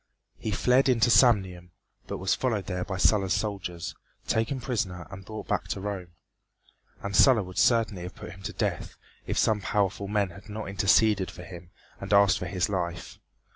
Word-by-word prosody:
He - - -4
fled 125 +6 +3
into 120 -1 +3
Samnium, 95 -9 +3 0.4
but - - -4
was 95 +1 0
followed 115 -7 -1
there 90 -1 -3
by 95 0 -4
Sulla's 95 -1 +3
soldiers, 95 -5 -4 0.3
taken 115 +4 0
prisoner 100 -8 -3
and 95 -1 -9
brought 110 +3 -8
back - - -1
to - - -3
Rome. 95 -3 -5 0.9
And 100 -1 -3
Sulla 125 -3 +6
would 90 -1 -5
certainly 110 -6 +2
have 90 +1 -7
put 105 -1 -9
him 95 - -13
to 105 +2 -5
death 100 -6 -3 0.3
if - - -2
some 105 -2 +2
powerful 100 0 -1
men 100 -2 0
had 100 +5 -14
not 105 0 -5
interceded 100 0 +3
for 90 - -10
him 85 -1 -11 0.3
and - - -7
asked 100 -2 +5
for 90 - -4
his 95 +3 0
life. 90 -4 -4
100 Hz, 180 wpm, -27 LUFS, 90-110 Hz, 0.9 s, Sulla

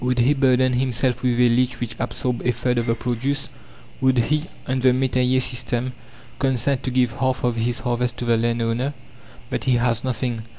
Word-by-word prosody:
Would 125 0 +1
he 125 +4 +4
burden 130 -2 +3
himself 125 0 0
with 125 -1 +1
a 125 - +6
lease 125 +1 +1
which 115 -2 -4
absorbed 125 -2 -2
a 125 - +2
third 120 +1 0
of 120 - -2
the 115 - +2
produce? 130 +4 -2 0.5
Would 130 -1 +3
he 150 +6 +1 0.2
on 130 0 -1
the 130 0 +4
métayer 130 0 +2
system 125 0 -1 0.5
consent 135 0 +1
to - - 0
give 125 -2 +2
half 130 -1 0
of 120 -1 +1
his 115 +1 -1
harvest 120 -1 -1
to 120 - -3
the 120 -1 +3
landowner? 115 +4 0 0.6
But - - -2
he 130 - +3
has 120 -1 +1
nothing. 120 -2 -2
125 Hz, 195 wpm, -22 LUFS, 120-130 Hz, 0.6 s, a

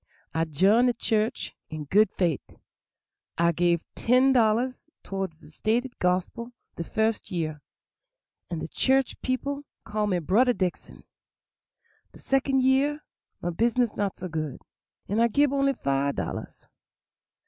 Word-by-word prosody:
I 160 +1 +1
jined 195 - +4
de 245 - +3
church 220 -1 -1
in 155 -1 -5
good 205 +8 +4
fait'; 170 -8 -2 0.8
I 170 0 +4
gave 170 0 +1
ten 255 +3 +4
dollars 245 +4 +1
toward 195 -2 -3
the 155 0 -17
stated 235 +9 -1
gospil 185 +7 -1 0.2
de 170 - -3
first 220 +4 -1
year, 155 -4 -3 0.9
and 165 -2 -3
de - - -4
church 265 +7 +1
people 280 +3 -2 0.2
call 210 -1 -1
me 185 -3 +1
'Brudder 220 - +3
Dickson'; 185 -2 -3 1.1
de - - -13
second 270 -1 +1
year 280 +3 +2 0.4
my 175 - 0
business 235 +5 +1
not 200 -2 -2
so 185 - -5
good, 155 -5 -4 0.4
and 210 +4 +1
I 235 - +5
gib 280 +4 +2
only 275 0 +2
five 140 - 0
dollars. - - -5
215 Hz, 135 wpm, -26 LUFS, 170-255 Hz, 1.1 s, I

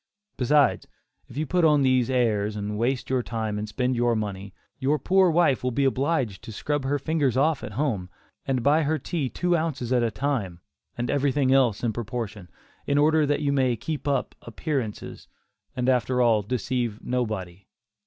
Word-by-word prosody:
Besides, 145 +3 +2 0.4
if - - -12
you 155 - 0
put 180 +3 +1
on 150 -3 +5
these 130 -2 +2
"airs," 110 -5 +1
and 105 0 -4
waste 125 +4 -1
your 130 -1 +2
time 110 -3 -3
and 105 0 -5
spend 125 +3 -1
your 120 0 +2
money, 100 -2 -4 0.3
your 140 +3 +1
poor 185 +6 +3
wife 165 -6 +2
will 125 - +1
be 135 +3 0
obliged 135 - 0
to - - -8
scrub 145 +5 -2
her 145 +2 +1
fingers 140 -3 0
off 155 +2 +2
at 105 - -6
home, 110 -8 -1 0.4
and 130 -3 0
buy 150 +3 +4
her 155 +1 0
tea 150 -4 -3
two 175 +5 0
ounces 145 -7 -1
at 125 - +3
a 115 - +1
time, 110 -9 -2 0.4
and 120 0 -1
everything 140 -1 +2
else 125 -6 +2
in 115 -2 0
proportion, 110 -4 -5 0.4
in 140 - +2
order 155 +1 +4
that 145 +1 0
you 140 -1 +1
may 130 -3 +2
keep 145 +5 -5
up 140 - 0
"appearances," 135 -10 -4 0.5
and 125 -1 -1
after 125 0 +2
all, 115 -3 +4
deceive 120 0 -2
nobody. 105 -7 -3
130 Hz, 185 wpm, -25 LUFS, 110-145 Hz, 0.5 s, on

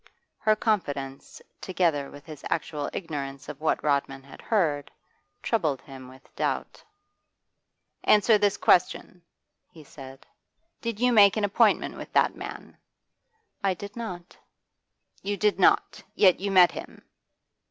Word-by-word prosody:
Her 215 0 +3
confidence, 145 -12 -3 0.2
together 165 -7 0
with 145 0 -13
his 155 -3 -11
actual 150 -3 -3
ignorance 140 -5 -6
of 150 0 -9
what 160 - 0
Rodman 140 -2 -1
had 140 - -14
heard, 155 -10 0 0.5
troubled 155 - 0
him 135 -2 -12
with 130 +1 -18
doubt. - - -3 1.2
'Answer 210 +1 +5
this 205 0 +1
question,' 180 -1 +1 0.5
he 165 -4 -15
said. 135 -1 -13 0.6
'Did 230 -3 -4
you 250 0 +3
make 205 -2 +6
an 215 - -1
appointment 205 -1 +2
with - - -9
that - - +3
man?' - - -9 0.9
'I 195 -1 +2
did 200 +2 -9
not.' 180 -7 -7 0.9
'You 205 +1 -3
did 210 0 +1
not? - - +3
Yet 185 -3 +4
you 200 +2 -2
met 185 -2 +6
him? - - -10
175 Hz, 130 wpm, -26 LUFS, 140-205 Hz, 1.2 s, make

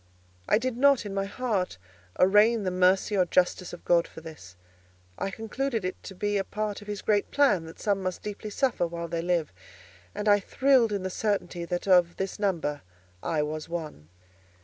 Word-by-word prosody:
I - - +5
did 245 +1 -2
not, 275 -3 +4
in 200 - -5
my 195 0 -1
heart, 200 - -2 0.4
arraign 210 +4 +5
the 185 - -1
mercy 185 +3 +3
or 185 -2 +3
justice 180 +1 +1
of 175 - -11
God 170 -1 +3
for - - -11
this; 155 - -11 0.6
I 195 - -1
concluded 225 +2 -3
it 185 - -4
to 195 - -8
be 205 +2 0
a - - 0
part 210 +1 -4
of 205 - -13
his 205 -2 -5
great 205 -1 +1
plan 275 - +3
that 160 - -11
some 200 -3 0
must 185 -1 -4
deeply 210 +1 -6
suffer 245 -6 0
while 170 0 -5
they 165 0 -2
live, 170 - 0 0.6
and 210 - -3
I 205 0 +6
thrilled 260 +1 +3
in 200 -2 -2
the 190 - -3
certainty 195 -4 -2
that 175 +2 -3
of 180 -2 +4
this 195 +1 -4
number, 165 -8 -1 0.4
I 155 -2 0
was 155 +1 -5
one. 155 - -6
195 Hz, 195 wpm, -27 LUFS, 175-210 Hz, 0.6 s, I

